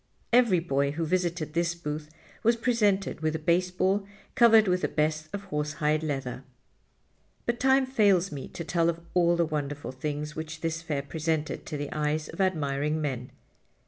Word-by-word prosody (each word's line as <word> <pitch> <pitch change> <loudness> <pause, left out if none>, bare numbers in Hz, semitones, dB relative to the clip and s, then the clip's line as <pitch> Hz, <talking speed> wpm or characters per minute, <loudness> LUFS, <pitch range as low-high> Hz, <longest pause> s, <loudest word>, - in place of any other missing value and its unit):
Every 235 -7 +5
boy 140 -4 0
who 165 +2 -2
visited 170 -2 -1
this 170 +1 0
booth 150 -2 -5 0.3
was 235 +1 +4
presented 210 -8 +1
with 155 0 0
a - - +1
baseball 180 +4 +1 0.3
covered 225 -3 +6
with 180 0 +2
the - - +1
best 155 0 0
of 200 0 -5
horsehide 150 -3 -1
leather. 135 -4 -3 1.0
But 235 0 -1
time 265 +1 +4
fails 200 -8 +3
me 140 -3 -6
to 170 - -7
tell 170 +1 +1
of 170 0 -2
all 175 -1 +4
the 170 0 +2
wonderful 145 -3 -3
things 150 +3 -4
which 155 0 -6
this 165 0 -2
Fair 150 -4 -2
presented 155 +1 -2
to 155 - -4
the 145 0 -4
eyes 150 0 -1
of - - -4
admiring 150 -4 0
men. 130 -5 -3
160 Hz, 170 wpm, -28 LUFS, 150-185 Hz, 1.0 s, covered